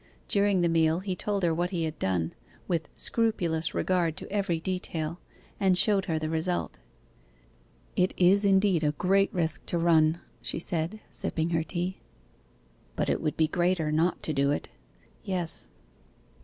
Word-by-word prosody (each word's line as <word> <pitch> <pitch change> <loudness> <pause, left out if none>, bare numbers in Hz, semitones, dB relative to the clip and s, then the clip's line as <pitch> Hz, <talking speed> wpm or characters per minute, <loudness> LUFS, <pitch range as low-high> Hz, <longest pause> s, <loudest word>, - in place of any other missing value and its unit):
During 200 -2 +2
the 175 - +3
meal 165 +1 +2
he 190 -1 -3
told 200 +1 -2
her 170 -2 +3
what 175 +2 -1
he 175 -3 -2
had 155 -1 -4
done, 85 -3 -1 0.3
with 165 -4 -1
scrupulous 175 -8 +2
regard 175 -4 +1
to - - -8
every 195 -5 0
detail, 170 -2 -3 0.4
and 190 -3 +3
showed 195 -1 +4
her 160 -3 -1
the 155 0 -2
result. 160 - -1 1.2
'It 180 - +2
is 190 +3 +5
indeed 195 -4 +3
a 150 0 +2
great 195 +5 +2
risk 165 -3 -2
to 175 - +3
run,' 165 -1 +3 0.2
she - - -3
said, 170 +5 -3
sipping 160 +1 -1
her 165 -1 +1
tea. 180 +2 -4 1.0
'But - - -1
it - - -1
would 155 -2 -2
be 160 - +4
a - - -5
greater 175 -3 +1
not 165 +3 +1
to 155 - -1
do 140 0 +2
it.' 145 - -2 0.5
'Yes. 180 -5 -3
170 Hz, 165 wpm, -28 LUFS, 160-185 Hz, 1.2 s, is